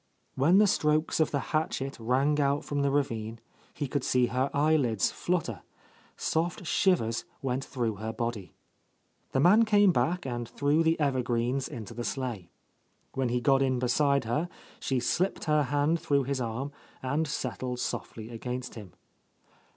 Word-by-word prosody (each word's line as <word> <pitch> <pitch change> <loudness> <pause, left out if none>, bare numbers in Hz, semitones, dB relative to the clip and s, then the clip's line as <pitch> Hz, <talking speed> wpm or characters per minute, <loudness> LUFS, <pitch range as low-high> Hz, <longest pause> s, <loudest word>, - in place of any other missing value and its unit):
When 160 +8 +4
the 210 - +7
strokes 155 -5 +1
of 160 - +3
the 140 - 0
hatchet 140 -4 -1
rang 135 +6 +1
out 140 +1 +1
from 145 -1 -1
the 140 - +2
ravine, 115 -6 -1 0.4
he 145 - -2
could 135 0 -2
see 125 -1 +3
her 130 +3 0
eyelids 140 -8 +2
flutter,.. 160 - -2 0.6
soft 170 +2 -1
shivers 160 - +2 0.2
went 130 0 -1
through 115 -6 -2
her 110 +2 -4
body. 115 -4 -4 0.8
The 135 - +1
man 195 +10 +6
came 205 -3 +5
back 180 +1 0
and 120 -2 -4
threw 145 +3 +2
the 165 0 +2
evergreens 130 -2 0
into 115 0 -8
the 120 +1 -5
sleigh. 120 -10 -4 0.6
When 135 -2 0
he 125 +1 +1
got 135 +1 +4
in 130 -2 +2
beside 140 +3 +2
her, 150 +10 -1 0.3
she 130 -2 0
slipped 180 +10 0
her 150 -2 +2
hand 145 +5 +1
through 145 -4 +1
his 135 0 -2
arm 125 +4 -3 0.3
and 150 +5 0
settled 125 -2 -3
softly 110 -2 -4
against 125 +2 -5
him. 105 -6 -10
135 Hz, 160 wpm, -29 LUFS, 120-150 Hz, 0.8 s, the